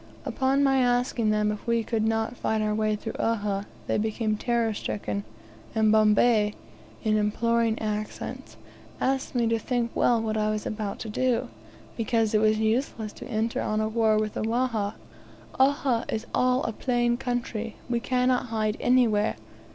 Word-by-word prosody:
Upon 270 +1 +1
my 270 -1 +4
asking 245 -2 +1
them 210 0 +2
if 210 +3 -7
we 235 -1 +2
could 220 -1 -1
not 225 +2 0
fight 220 -2 -1
our 215 0 0
way 215 0 +1
through 220 +2 -6
Uhha, 205 -3 0 0.2
they - - 0
became 215 0 0
terror 230 0 0
stricken, 105 - -3 0.5
and 220 -1 +4
Bombay, 215 0 +4 0.5
in 215 -2 +2
imploring 230 +2 +1
accents, 215 -1 -5 0.4
asked 270 0 -1
me 240 -1 +2
to 230 0 +1
think 240 0 -1
well 240 -1 +3
what 220 -1 -1
I 215 0 +1
was 215 0 -2
about 210 -2 -3
to 220 - -5
do, 250 +2 0 0.5
because 225 -1 0
it 215 - +4
was 215 0 +3
useless 220 -1 -1
to - - -9
enter 225 +1 -1
on 215 0 -1
a 215 - +1
war 220 -1 +2
with 215 0 -1
the - - -3
Wahha. 225 -2 0 0.6
"Uhha 265 -3 +2
is 220 +1 -2
all 255 +1 +2
a - - -1
plain 240 0 +1
country; 240 -3 -3
we 240 -1 0
cannot 250 +1 +1
hide 220 -1 -1
anywhere. 230 -4 +3
225 Hz, 165 wpm, -26 LUFS, 215-240 Hz, 0.6 s, my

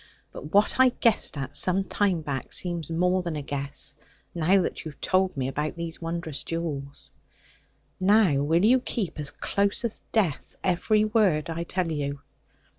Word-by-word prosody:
But 150 - -9
what 205 +6 +3
I 260 0 +7
guessed 230 -9 +2
at 135 -1 -5
some 190 +1 +4
time 190 -2 0
back 140 -4 -5
seems 170 -4 -1
more 180 +3 +1
than 170 -3 -4
a 150 - -4
guess, 140 0 -2 0.4
now 175 +4 +3
that - - -4
you 160 - -5
have 145 - -15
told 185 -3 +1
me 130 -1 -1
about 150 +4 -3
these 170 0 -5
wondrous 165 -4 -3
jewels. 145 -5 -4 0.9
Now 195 -5 +4
will 165 +6 +2
you 255 +4 +5
keep, 195 -10 -3
as 145 -1 -1
close 200 +8 0
as 225 - -4
death, 190 - 0
every 210 +4 +2
word 195 -8 +2
I 170 +1 -3
tell 180 -1 -2
you?' 140 -2 -3
170 Hz, 170 wpm, -26 LUFS, 150-195 Hz, 0.9 s, I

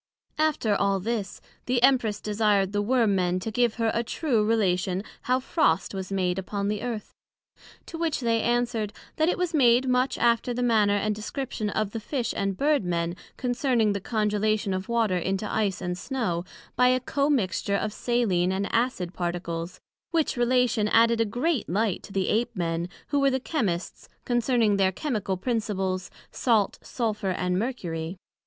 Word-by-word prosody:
After 305 -9 +2
all 200 -1 +1
this, 210 -1 -3 0.3
the 250 0 +2
Empress 245 -6 +3
desired 205 -2 +1
the 205 0 0
Worm 225 -1 +2
men 180 -1 +1
to 220 - -4
give 240 0 +1
her 230 -2 +1
a 235 - 0
true 235 -2 0
Relation 190 -4 +1 0.3
how 255 0 +4
frost 230 - +1
was 190 0 -5
made 185 -1 0
upon 200 +1 -3
the 210 -1 -2
Earth? 235 -4 -5 0.7
To 330 - -8
which 330 -3 0
they 230 -2 +1
answered, 235 -3 0 0.2
That 315 +2 +3
it - - 0
was 360 -1 -1
made 255 -3 +4
much 250 +1 +1
after 235 +1 +2
the 250 - -1
manner 215 -4 +3
and 210 +1 0
description 215 +1 -4
of 215 0 -1
the 225 - -4
Fish 240 +3 -2
and 195 -1 -1
Bird 295 -3 +2
men, 170 -1 -1 0.2
concerning 245 -4 +1
the 200 - -3
Congelation 210 -1 0
of 185 +2 -4
Water 225 -6 +1
into 195 +4 -2
Ice 200 -4 -1
and 180 -1 -2
Snow, 185 -5 -2 0.3
by 250 +1 +4
a 255 0 +3
commixture 250 -9 0
of 210 +1 -2
saline 205 -8 +1
and 195 +1 -2
acid 225 -7 0
particles; 175 -1 -4 0.3
which 325 -3 +1
relation 245 -3 +2
added 230 +1 +4
a - - +3
great 250 +6 -1
light 200 +1 0
to - - -12
the 195 -1 0
Ape 235 +2 0
men, 170 -1 -2 0.2
who 285 - +2
were 275 0 +4
the 265 0 0
Chymists, 205 - -3 0.2
concerning 240 -4 +2
their 190 -1 +3
Chymical 200 -4 -2
principles, 195 -5 -2 0.2
Salt, 225 -5 +1
Sulphur, 215 -4 -2
and 180 0 0
Mercury. 175 -8 -3
215 Hz, 170 wpm, -26 LUFS, 190-245 Hz, 0.7 s, how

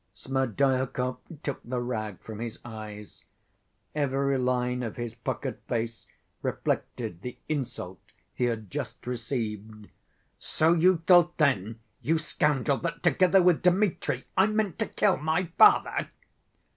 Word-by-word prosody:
Smerdyakov 130 0 0 0.3
took 140 - -3
the 125 +1 -3
rag 110 -5 -3
from 110 -1 -8
his 115 -1 -5
eyes. 105 -2 -9 0.7
Every 140 -2 +1
line 125 0 0
of 115 -3 -4
his 120 -2 -4
puckered 120 - -4
face 115 0 -3 0.3
reflected 85 0 -2
the 125 +2 -7
insult 125 -11 -4 0.3
he 125 - 0
had 110 -5 -3
just - - -5
received. 110 -3 -4 0.5
"So 160 +2 +2
you 175 0 +3
thought 175 -1 +6
then, 115 - +1 0.2
you 160 +2 +2
scoundrel, 145 -3 +1
that 165 -1 -4
together 185 0 +5
with 175 -2 +4
Dmitri 180 +2 +1
I 190 +2 +5
meant 215 -5 -1
to - - 0
kill - - +2
my 160 +3 -1
father?" - - +5
130 Hz, 130 wpm, -28 LUFS, 115-160 Hz, 0.7 s, thought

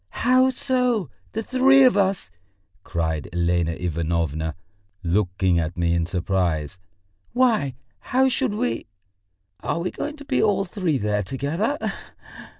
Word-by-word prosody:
"How 255 +1 +5
so, 250 - 0 0.2
the 225 - -2
three 270 +3 +5
of 255 -4 +5
us?" 195 - +1 0.5
cried 80 -4 -2
Elena 85 0 +1
Ivanovna, 80 -2 -2 0.5
looking 90 0 +1
at 85 +2 -3
me 85 -1 +1
in 85 -1 0
surprise. 90 -3 -1 0.5
"Why, 225 - +2 0.2
how 265 +1 +2
should 260 -4 0
we... 245 - -2 0.7
are - - -2
we 180 +2 -2
going 295 - -4
to 285 - -10
be - - +1
all 205 -2 +2
three 180 -5 -1
there 105 -2 0
together? 145 - -2
130 Hz, 130 wpm, -23 LUFS, -, 0.7 s, How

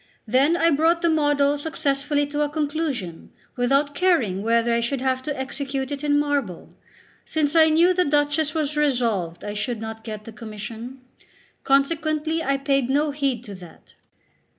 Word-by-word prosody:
Then 270 +9 +3
I 335 0 +3
brought 330 +4 +2
the 335 - +3
model 290 -2 +2
successfully 290 -1 0
to 290 +1 -3
a 295 - +1
conclusion, 290 - -3 0.2
without 275 +4 +1
caring 280 - +1
whether 230 +2 +2
I 235 - +2
should 240 +3 -1
have 260 0 0
to 290 0 -4
execute 270 0 -4
it 285 0 -4
in 290 -1 +2
marble, 285 - -2 0.5
since 310 -1 -1
I 320 -1 +6
knew 335 +4 +4
the 365 0 +2
Duchess 295 +1 +1
was 305 -1 -1
resolved 235 - 0
I 205 - -4
should 220 +2 -3
not 220 0 -7
get 215 -2 -7
the 225 - -10
commission. 225 +4 -8 0.6
Consequently 310 +3 +1
I 275 -1 +1
paid 275 -2 0
no 290 +2 +1
heed 275 -5 -2
to 210 -5 -9
that. 180 -3 -14
280 Hz, 165 wpm, -23 LUFS, 235-300 Hz, 0.6 s, I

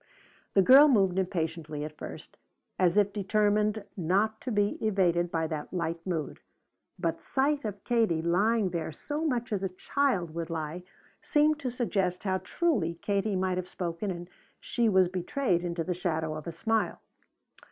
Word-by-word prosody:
The 195 - +6
girl 275 +7 +9
moved 195 -8 +3
impatiently 160 -4 -2
at 155 0 -8
first, - - -9 0.4
as 180 +1 +3
if 205 -1 +3
determined 210 +1 +1
not 200 +5 +1
to 255 - -4
be 205 0 0
evaded 175 -5 +2
by 165 -1 -1
that 155 -2 -5
light 170 -2 -3
mood, 165 -5 -3 0.6
but 170 -2 -2
sight 280 +2 0
of 200 -2 -5
Katie, 220 -9 +1
lying 200 +4 +2
there 165 -2 -3
so 295 - -4
much 240 -7 -1
as 195 - -1
a 190 - -1
child 185 - 0
would 165 0 -4
lie, 160 +1 -4 0.4
seemed 300 0 +2
to 265 -3 -2
suggest 195 -7 -1
how 190 -2 0
truly 190 - 0
Katie 200 0 0
might 185 -1 0
have 180 0 -3
spoken 175 +2 -3
and 175 -1 -5 0.3
she 235 -2 0
was 190 -2 +4
betrayed 180 +1 -1
into 170 -1 -2
the 180 - -1
shadow 160 -3 -2
of 155 0 -7
a - - -2
smile. 220 +7 -1
190 Hz, 165 wpm, -29 LUFS, 170-220 Hz, 0.6 s, girl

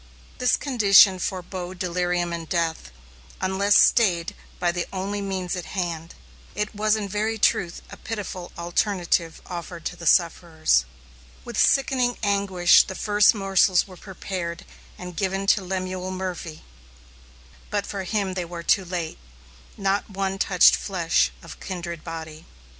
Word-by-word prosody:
This 250 -2 +3
condition 200 -7 +5
forebode 185 0 -5
delirium 175 -1 -1
and 165 -1 -6
death, 165 - -1 0.5
unless 195 +2 +3
stayed 180 -8 +3 0.3
by 175 -1 +1
the 175 0 -3
only 195 +2 -3
means 190 -2 -3
at 180 - -5
hand. 170 -2 -3 0.4
It 210 +1 -2
was 215 +1 +2
in 210 -2 -3
very 215 +3 -1
truth 175 -4 +1
a - - -9
pitiful 200 -5 -6
alternative 170 -1 -1
offered 175 -1 -7
to - - -3
the 170 -1 -6
sufferers. 160 - +2 0.6
With - - -7
sickening 255 -3 +2
anguish 200 -3 +4
the 190 - -6
first 210 +2 +4
morsels 195 -2 +3
were 185 - -12
prepared 180 -2 -6 0.3
and 180 -1 -8
given 195 +2 -1
to 200 - -4
Lemuel 185 0 -4
Murphy, 180 -4 -5 1.1
but 205 -1 -1
for 195 -2 -5
him 195 -1 -1
they 180 -1 -2
were 170 0 -7
too 190 +2 +2
late. 175 -3 -4 0.6
Not 195 +1 0
one 195 -1 -3
touched 180 -2 +5
flesh 175 -4 +1
of 165 - -11
kindred 170 -3 -6
body. 160 -1 -8
185 Hz, 140 wpm, -24 LUFS, 175-200 Hz, 1.1 s, condition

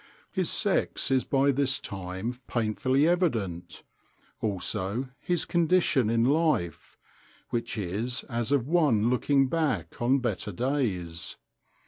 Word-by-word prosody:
His - - 0
sex - - +1
is 130 -1 +3
by 140 0 +3
this 135 -1 +1
time 95 +4 -5
painfully 130 +5 +1
evident; 115 - -1 0.6
also 105 +4 -2
his 175 -2 -1
condition 170 -8 +2
in 115 0 +2
life, 125 - 0 0.5
which 120 -1 -2
is 105 +6 -2
as 120 +1 -3
of 135 -4 +2
one 140 -9 +3
looking 135 +2 +3
back 155 -3 -1
on 125 +3 +3
better 120 -4 -2
days. 100 - -2
125 Hz, 115 wpm, -28 LUFS, 105-140 Hz, 0.6 s, is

